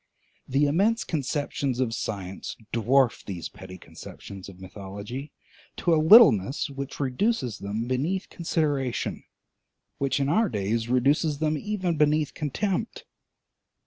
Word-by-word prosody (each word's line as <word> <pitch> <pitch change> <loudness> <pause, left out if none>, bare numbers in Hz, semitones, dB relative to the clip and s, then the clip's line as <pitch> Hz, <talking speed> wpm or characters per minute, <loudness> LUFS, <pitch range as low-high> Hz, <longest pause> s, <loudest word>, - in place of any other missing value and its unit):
The 135 +3 +2
immense 200 +10 +2
conceptions 140 -3 -2
of 125 -3 0
science 95 -4 -5 0.2
dwarf 120 +2 +2
these 90 -5 -6
petty 95 -1 -11
conceptions 95 0 -11
of 95 -1 -14
mythology 100 +8 -8 0.5
to 175 - +2
a 155 - +4
littleness 155 - +6
which 140 0 -6
reduces 130 - 0
them 105 +4 -3
beneath 150 +10 -1
consideration, 145 -7 -1 0.8
which 135 -1 0
in 135 - +1
our 210 +8 +2
days 110 +2 -1
reduces 140 +4 +2
them 155 +1 0
even 185 -1 -2
beneath 150 0 +2
contempt. 190 - -2
135 Hz, 120 wpm, -26 LUFS, 115-155 Hz, 0.8 s, littleness